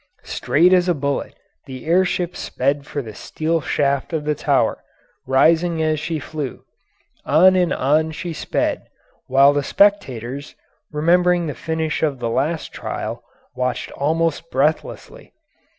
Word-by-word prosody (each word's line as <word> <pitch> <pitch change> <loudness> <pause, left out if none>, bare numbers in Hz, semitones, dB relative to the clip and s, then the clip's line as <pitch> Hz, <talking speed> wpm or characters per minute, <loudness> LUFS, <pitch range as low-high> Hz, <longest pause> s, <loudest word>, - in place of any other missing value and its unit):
Straight 160 +9 +2
as 180 0 +3
a 175 - +2
bullet 140 -1 -3 0.3
the 130 0 -8
air 175 +4 +4
ship 180 -1 -2
sped 140 +2 -2
for 145 - -4
the 110 -2 -9
steel 160 +9 -2
shaft 140 +2 -1
of 155 -2 -2
the 150 - +1
tower, - - 0 0.4
rising 165 +5 +3
as 155 -1 +1
she 160 +2 -3
flew. 150 -2 -6 0.6
On 185 +5 +5
and 180 -2 +2
on 155 +4 +2
she 165 +2 -5
sped, - - -2 0.4
while 135 +2 +5
the 145 - +1
spectators, 140 - 0 0.4
remembering 175 +3 +2
the 150 - -3
finish 160 +2 -3
of 150 -4 0
the 120 -2 -3
last 155 +7 -1
trial, - - -5 0.3
watched 125 0 -2
almost 165 +2 -1
breathlessly. 150 +3 -2
155 Hz, 140 wpm, -20 LUFS, 140-165 Hz, 0.6 s, On